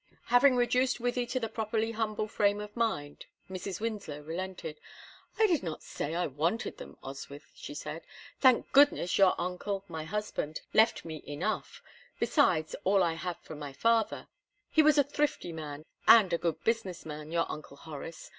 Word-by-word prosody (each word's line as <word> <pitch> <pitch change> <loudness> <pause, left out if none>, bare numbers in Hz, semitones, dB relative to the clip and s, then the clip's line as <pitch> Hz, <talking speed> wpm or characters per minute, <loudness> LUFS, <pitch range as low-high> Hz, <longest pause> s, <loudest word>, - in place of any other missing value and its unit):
Having 255 +1 +7
reduced 250 +1 +2
Wythie 245 0 -1
to 255 - 0
the 225 - -2
properly 220 0 -1
humble 215 -1 -2
frame 205 -1 +2
of 210 0 -8
mind, 185 -12 -2 0.2
Mrs. 185 0 -5
Winslow 210 -10 -4
relented. 165 0 -5 0.6
"I 445 - +5
did 345 -7 +2
not 165 -4 -5
say 155 +3 -4
I 175 - +1
wanted 165 - -1
them, - - -10
Oswyth," - - -9
she - - -9
said. - - -5 0.4
"Thank 255 -3 +4
goodness, 275 -11 +5
your 190 -2 +5
uncle, 190 +2 -3
my 160 -2 -5
husband, 190 -5 -3
left 220 -4 +4
me 160 -2 -6
enough, 170 +9 -3 0.4
besides 160 - +2
all 195 0 +4
I 170 -2 +1
had 175 +1 -4
from 155 - -9
my 145 -2 -6
father; 230 +6 +1 0.4
he 315 - +6
was 305 0 +5
a 285 - +7
thrifty 285 - -1
man, 155 -1 -7 0.2
and 205 -6 +8
a 170 - +2
good 160 -2 -2
business 225 -6 -1
man, 150 0 -7
your 170 0 +2
Uncle 150 -2 -8
Horace. 155 +2 -8
195 Hz, 170 wpm, -30 LUFS, 160-230 Hz, 0.6 s, and